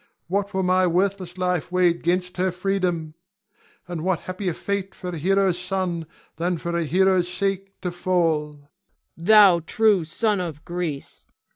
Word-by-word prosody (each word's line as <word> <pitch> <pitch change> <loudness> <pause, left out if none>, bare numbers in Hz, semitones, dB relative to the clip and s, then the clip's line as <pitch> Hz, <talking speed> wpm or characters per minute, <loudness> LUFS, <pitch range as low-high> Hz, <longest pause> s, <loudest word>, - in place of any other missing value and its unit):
What 200 +3 -1
were 190 0 -1
my 185 0 +3
worthless 185 0 -1
life 180 -3 -1
weighed 180 -2 +2
'gainst 180 +2 -1
her 185 +1 +1
freedom. 180 -4 -1 0.7
And 175 -2 -5
what 185 -2 0
happier 185 -2 -3
fate 200 -1 -3
for 180 -1 -6
a 170 - -5
hero's 190 +1 +2
son 180 -3 -2 0.3
than 175 +1 0
for 170 +1 -4
a 170 -1 0
hero's 185 +2 +2
sake 195 +1 -3
to 180 - -2
fall! 170 -4 0
Cleon. 145 0 -21 0.5
Thou 195 0 +6
true 205 +2 +2
son 205 +6 0
of 160 -4 -5
Greece! 175 -5 -5
180 Hz, 155 wpm, -23 LUFS, 170-190 Hz, 0.7 s, Thou